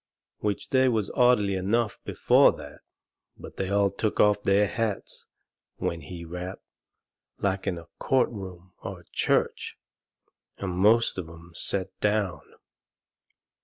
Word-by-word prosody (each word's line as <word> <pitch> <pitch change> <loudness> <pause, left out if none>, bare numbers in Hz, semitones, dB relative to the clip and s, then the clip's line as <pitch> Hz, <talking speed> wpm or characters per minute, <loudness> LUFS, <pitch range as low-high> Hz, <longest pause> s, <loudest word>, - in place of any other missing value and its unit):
Which 105 -2 -2
they 130 -1 +4
was 110 -5 0
orderly 120 -5 +3
enough 105 +4 0
before - - +4
that, - - -10 0.6
but - - -11
they 95 - -2
all 100 0 +2
took 105 +2 -2
off 105 -1 +4
their 100 +1 +3
hats 110 -1 -3 0.5
when 85 -1 -3
he 85 +4 -8
rapped, 90 +3 -7 0.7
like 95 0 -1
in 90 -3 0
a 85 - -9
court 130 -2 +2
room 95 -4 -9
or - - -7
a - - -25
church, - - 0 0.8
and 95 -2 -3
most 105 +4 +3
of 85 -3 -6
'em 85 +1 -13
set 95 +2 0
down. 105 -4 0
100 Hz, 135 wpm, -27 LUFS, 90-105 Hz, 0.8 s, they